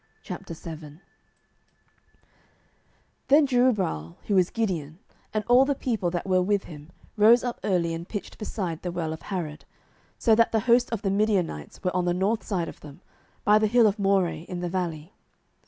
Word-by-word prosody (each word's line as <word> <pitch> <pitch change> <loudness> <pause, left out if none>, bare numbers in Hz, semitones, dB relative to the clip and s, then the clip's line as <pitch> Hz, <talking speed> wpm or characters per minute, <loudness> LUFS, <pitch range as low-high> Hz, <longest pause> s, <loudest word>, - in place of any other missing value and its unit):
07:007:001 160 -2 -8 2.3
Then 290 +2 +6
Jerubbaal, 210 - +1
who 205 - 0
is 185 -2 +4
Gideon, 170 -9 -2 0.3
and 215 0 -1
all 245 +2 +6
the 280 +1 0
people 225 -9 -1
that 175 0 -3
were 185 -1 +2
with 200 +1 +1
him, 150 -1 -11 0.3
rose 225 +3 +6
up 245 -1 -3
early, 170 -4 +1
and 165 +1 -6
pitched 205 -4 -6
beside 185 -6 -4
the 180 - -4
well 165 -2 -3
of 160 - -9
Harod: 165 -6 -5 0.5
so 225 - +3
that 230 +1 +4
the 220 - +1
host 240 +2 +3
of 230 -2 -3
the 195 - +1
Midianites 195 - -1
were 180 -1 -1
on 180 -1 +1
the 175 0 +1
north 205 +5 0
side 180 -5 -2
of - - -9
them, 145 -2 -12 0.4
by 210 +1 +5
the 215 - +2
hill 235 +2 +4
of 210 0 +2
Moreh, 195 -5 +1
in 175 -1 -5
the 175 - -2
valley. 170 -2 -4
190 Hz, 175 wpm, -26 LUFS, 170-220 Hz, 2.3 s, Then